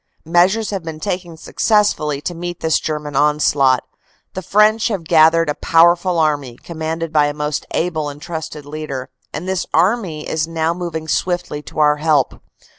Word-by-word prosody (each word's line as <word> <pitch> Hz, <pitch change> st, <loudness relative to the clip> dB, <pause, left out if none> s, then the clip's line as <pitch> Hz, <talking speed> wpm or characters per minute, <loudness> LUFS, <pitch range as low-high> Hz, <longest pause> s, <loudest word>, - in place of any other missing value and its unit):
"Measures 185 Hz, +7 st, +2 dB
have 195 Hz, -2 st, -3 dB
been 160 Hz, -1 st, -7 dB
taken 180 Hz, -2 st, -4 dB
successfully 160 Hz, -8 st, +1 dB
to 160 Hz, +4 st, -4 dB
meet 175 Hz, 0 st, -6 dB
this 160 Hz, -1 st, +2 dB
Ger 155 Hz, -1 st, -2 dB
man 150 Hz, -1 st, -8 dB
onslaught. 145 Hz, -2 st, +3 dB, 0.5 s
The 190 Hz, -, -4 dB
French 215 Hz, +4 st, +3 dB
have 200 Hz, -7 st, -3 dB
gathered 165 Hz, 0 st, +4 dB
a 150 Hz, -, 0 dB
powerful 170 Hz, +3 st, +3 dB
Army, 145 Hz, -6 st, 0 dB
commanded 160 Hz, 0 st, -5 dB
by 150 Hz, -1 st, +4 dB
a 145 Hz, -, -4 dB
most 150 Hz, 0 st, -3 dB
able 160 Hz, -3 st, -1 dB
and 145 Hz, 0 st, -9 dB
trusted 155 Hz, -2 st, -6 dB
leader, 145 Hz, -3 st, -6 dB, 0.2 s
and 175 Hz, -, -6 dB
this 190 Hz, -1 st, -2 dB
Army 175 Hz, -3 st, +1 dB
is 160 Hz, 0 st, -1 dB
now 165 Hz, 0 st, -1 dB
moving 170 Hz, -3 st, -5 dB
swiftly 175 Hz, -3 st, -1 dB
to -, -, -13 dB
our 150 Hz, -1 st, +4 dB
help. 150 Hz, -3 st, +1 dB
160 Hz, 170 wpm, -18 LUFS, 150-175 Hz, 0.5 s, gathered